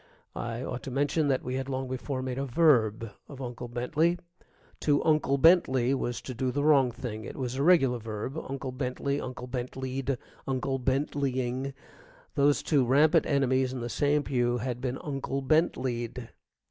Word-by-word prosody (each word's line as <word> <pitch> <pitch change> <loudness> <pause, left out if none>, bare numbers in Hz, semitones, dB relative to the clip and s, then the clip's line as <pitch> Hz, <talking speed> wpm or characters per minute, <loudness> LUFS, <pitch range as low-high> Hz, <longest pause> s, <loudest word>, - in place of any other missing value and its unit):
I 120 +1 -4
ought 125 -1 -4
to - - -6
mention 145 +3 +1
that 135 -2 +1
we 125 - -4
had 135 0 -4
long 130 0 -2
before 130 +1 -3
made 130 0 -3
a 140 - -1
verb 115 -7 +3 0.2
of 135 - -10
Uncle 125 -1 -6
Bentley. 150 +9 +1 0.6
To 145 -1 +3
unclebentley 140 -3 +4
was 120 -3 -2
to 130 - -5
do 130 +2 -1
the 145 +3 -1
wrong 140 -4 +5
thing. 115 -3 -6
It - - -7
was 125 -3 -3
a 135 - -2
regular 140 -7 +4
verb, 110 +3 -5
unclebentley, 135 -1 -3
unclebentleyed, 130 +1 -4 0.3
unclebentleying. 135 0 -1 0.6
Those 145 0 +3
two 145 -5 +3
rampant 140 +5 +4
enemies 130 -2 +2
in 130 - -4
the 120 - -3
same 145 +3 +1
pew 120 -3 +1
had 125 0 -3
been 130 0 -2
unclebentleyed. 135 -4 -1
130 Hz, 150 wpm, -28 LUFS, 125-140 Hz, 0.6 s, wrong